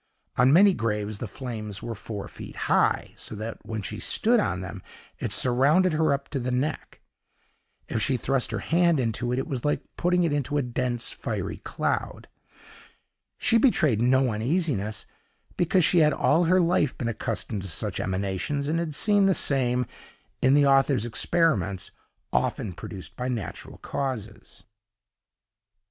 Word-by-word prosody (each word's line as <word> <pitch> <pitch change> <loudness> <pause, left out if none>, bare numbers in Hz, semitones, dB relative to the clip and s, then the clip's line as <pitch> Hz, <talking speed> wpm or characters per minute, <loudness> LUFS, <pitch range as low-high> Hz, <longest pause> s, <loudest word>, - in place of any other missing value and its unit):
On 125 +2 +4
many 195 +5 +6
graves 105 - -2
the 120 - -4
flames 110 -4 -6
were 115 - -4
four 105 -1 -7
feet - - -10
high, - - +1
so - - -6
that 110 +2 -6
when 110 -2 -5
she 105 +3 -5
stood 235 +2 +2
on 95 - -1
them, 95 +1 -7 0.4
it - - -3
surrounded 145 +9 +4
her 155 0 +2
up 140 0 -1
to 140 - -2
the 125 0 -3
neck. 130 +5 -3 0.9
If 110 - -2
she 130 +1 +1
thrust 135 +2 0
her - - -2
hand 170 -2 +2
into 120 0 -1
it, 125 - 0
it 135 - -1
was 130 -4 -4
like 150 - 0
putting 180 0 +2
it 165 -3 +1
into 145 0 -1
a 145 - +1
dense, 125 -1 -2
fiery - - -4
cloud. - - -3 1.1
She 230 - +3
betrayed 155 - +3
no 130 +1 +3
uneasiness, 110 - -1 0.5
because 175 0 +3
she 175 - +4
had 150 -2 +4
all 165 +5 +2
her 185 +3 +4
life 170 -5 +1
been 120 - -3
accustomed 110 -2 -3
to 95 - -5
such 80 - -2
emanations, 95 +10 -2
and 165 +2 0
had 160 -3 -3
seen 205 +1 +4
the 190 - +3
same, 125 -3 +2 0.6
in 130 +2 +4
the 145 -1 +5
author's 135 -4 +3
experiments, 110 - 0 0.4
often 100 - 0
produced 90 -2 -9
by 125 - -3
natural 120 -6 -5
causes. 130 -6 -5
130 Hz, 160 wpm, -26 LUFS, 110-155 Hz, 1.1 s, many